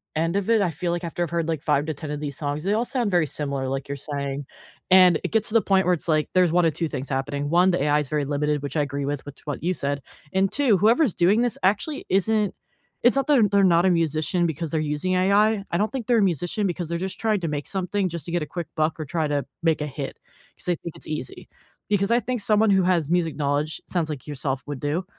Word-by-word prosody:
end 165 +4 0
of 200 +1 -2
it, 225 -2 +4
I 180 -4 +1
feel 170 +3 -3
like 175 0 -3
after 170 +1 -4
I've 170 - -3
heard, 170 -1 -1
like, 160 -3 -1
5 150 -2 +1
to 160 - -1
10 155 +1 -8
of 150 0 -4
these 145 -3 -5
songs, 145 0 -3
they 195 +3 +1
all 225 +3 +1
sound 245 -5 -1
very 175 -4 +3
similar, 140 -2 -3
like 135 +1 -4
you're 140 - -3
saying, 140 0 -4 0.4
and 185 -3 +7
it - - -3
gets 220 -1 +1
to - - -6
the 225 - +5
point 190 -2 +2
where 180 - +3
it's 175 - -4
like, 155 -2 +1
there's 180 -3 +4
1 175 -1 +4
or 165 - +3
2 165 +2 -2
things 135 -2 -5
happening. 140 +2 -2
1, 180 +3 +4
the 175 - 0
AI 150 0 +3
is 150 - -2
very 150 -1 0
limited, 150 +1 0
which 145 +3 -4
I - - +3
agree 140 -1 -2
with, 145 -1 -3
which 145 -1 -11
what 145 -2 -4
you 180 +2 +1
said, 140 -4 -2 0.3
and 190 0 +2
2, 260 -8 +3
whoever's 225 - +3
doing 195 +6 +3
this 240 -3 0
actually 210 +10 0
isn't 205 +2 +1 0.5
it's 245 +2 +5
not 275 -1 +1
that 300 - +4
they're 225 -6 +5
they're 200 0 +3
not 175 -1 +4
a - - +5
musician 165 +1 +1
because 160 0 -4
they're 160 - 0
using 150 +4 -1
AI, 200 +3 +3
I 170 - 0
don't 210 +3 0
think 260 -5 -5
they're 240 -2 +4
a - - +4
musician 175 +3 0
because 175 -3 -3
they're 170 - -1
just 190 +2 -4
trying 215 -2 +1
to 170 - -2
make 145 -2 -3
something 190 0 -1
just 170 -3 -6
to - - -6
get 175 0 0
a - - -2
quick 175 +1 -5
buck 155 0 0
or 155 - -3
try 160 +1 -1
to 145 -1 -1 0.2
make 165 -2 +1
a - - -1
hit, 140 -1 -6 0.4
'cause - - -13
they 180 - +1
think 170 0 -9
it's - - -12
easy. 150 -5 -6 0.4
Because 200 -1 +1
I 235 +1 +4
think 245 -2 -3
someone 215 +1 +3
who 190 -1 +4
has 170 -4 +1
music 170 -3 +1
knowledge, 145 +1 -1
sounds 170 -4 -1
like 145 -5 -6
yourself 135 -2 -2
would 145 -2 -5
do, 150 +6 -2
170 Hz, 275 wpm, -24 LUFS, 150-195 Hz, 0.5 s, and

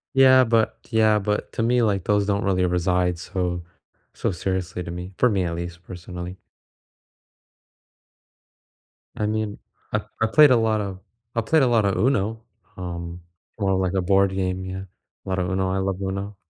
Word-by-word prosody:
Yeah, 130 -1 +7
but 115 -1 +1
yeah, 110 -1 +4
but 105 +1 -2
to 115 - -1
me, 120 +1 +3
like, 100 -5 +1
those 105 -1 +1
don't 100 0 0
really 95 -2 +2
reside 90 0 +1
so 90 -1 -3 0.5
so - - -1
seriously 90 0 -3
to 85 - -6
me 90 +2 -6
for 125 - +4
me, 100 -5 +1
at 85 -1 -2
least, 85 0 -6
personally. 90 0 -8 2.8
I 105 - -1
mean, 110 -1 -2 0.4
I - - +1 0.2
I - - +5
played 150 +5 +7
a 125 - +6
lot 110 -1 +1
of 95 -2 -5 0.4
I 115 - +2
played 155 +8 +3
a 130 - +4
lotta 110 -5 +2
UNO, 110 -3 +1 0.4
um, 85 -1 -6 0.4
more, 95 -1 +1
like, 95 -1 0
a 95 - +1
board 95 +1 +3
game, 95 -1 -2
yeah. 95 0 -5 0.4
A - - -7
lotta 90 -1 0
UNO; 95 0 0
I 95 - 0
love 95 0 -2
UNO. 100 +1 -3
95 Hz, 170 wpm, -23 LUFS, 90-110 Hz, 2.8 s, Yeah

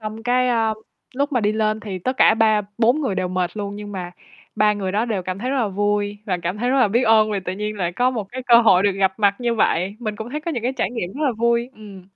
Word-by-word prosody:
xong 215 +1 -7
cái, 250 +1 +2
ơ, 225 -2 +1 0.4
lúc 285 +3 -1
mà 250 - +2
đi 210 0 +1
lên 215 0 0
thì 200 -4 -6
tất 255 +9 -3
cả 220 - +5
ba 220 -1 +3 0.2
bốn 240 +6 +3
người 255 -10 -1
đều 185 - -1
mệt 180 +1 -2
luôn, 205 -1 -4
nhưng 205 0 -8
mà 180 -3 -5 0.4
3 210 0 +3
người 195 -2 -3
đó 215 +3 +1
đều 215 -6 -2
cảm 185 +1 -5
thấy 250 +5 -3
rất 275 - 0
là 235 -5 +1
vui 205 +1 -1
và 185 -3 -1
cảm 175 +3 -2
thấy 245 +3 0
rất 270 - +2
là 250 - +4
biết 235 +5 +1
ơn 220 -2 +4
vì 205 -2 -1
tự 185 0 -4
nhiên 210 +2 -4
lại 175 -3 -2
có 245 +7 +1
một 230 -5 -3
cái 260 +1 -5
cơ 240 - +5
hội 190 -6 +5
được 200 - +3
gặp 190 -1 +1
mặt 200 -2 +3
như 240 -1 0
vậy. 195 -2 0
Mình 215 -3 -4
cũng 220 +3 -7
thấy 300 +3 -4
có 335 - -4
những 245 -8 -3
cái 250 +2 0
trải 240 -7 -2
nghiệm 195 -7 -4
rất 300 +4 -3
là 270 - +2
vui. 235 +2 0
Ừm. 205 -3 -12
215 Hz, 295 wpm, -21 LUFS, 200-240 Hz, 0.4 s, cả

